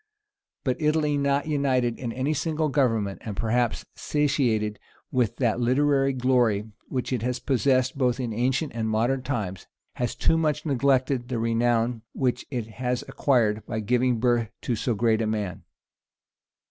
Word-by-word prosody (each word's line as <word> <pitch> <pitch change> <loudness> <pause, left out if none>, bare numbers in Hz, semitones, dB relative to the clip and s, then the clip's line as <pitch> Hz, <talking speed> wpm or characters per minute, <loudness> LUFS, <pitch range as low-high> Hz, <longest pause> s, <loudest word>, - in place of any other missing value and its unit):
But 130 +3 -1
Italy 150 -1 +2
not 140 0 +1
united 130 -6 0
in 120 -3 -3
any 130 +5 -1
single 155 0 -1
government, 115 -8 0
and 105 -4 -6
perhaps 120 +2 0
satiated 125 -8 0 0.3
with 125 -5 +1
that 120 -3 +1
literary 135 +2 +3
glory 120 -5 +1 0.2
which 130 0 -2
it 125 - -1
has 125 +2 -1
possessed 130 +1 +1
both 125 -1 +2
in 120 -3 -2
ancient 130 +6 0
and 110 -1 -2
modern 120 +5 +1
times, 110 -9 -4 0.3
has 125 -2 -1
too 165 - +2
much 155 -1 0
neglected 130 -2 +1
the 125 -2 -2
renown 115 0 +1
which 125 -2 -1
it 125 -5 -3 0.2
has 125 +1 0
acquired 110 -6 +1
by 110 - -2
giving 125 +2 +1
birth 120 -2 +2
to 120 - 0
so 115 +2 -1
great 110 +1 +2
a 110 - 0
man. 105 -5 -3
125 Hz, 155 wpm, -26 LUFS, 115-135 Hz, 0.3 s, literary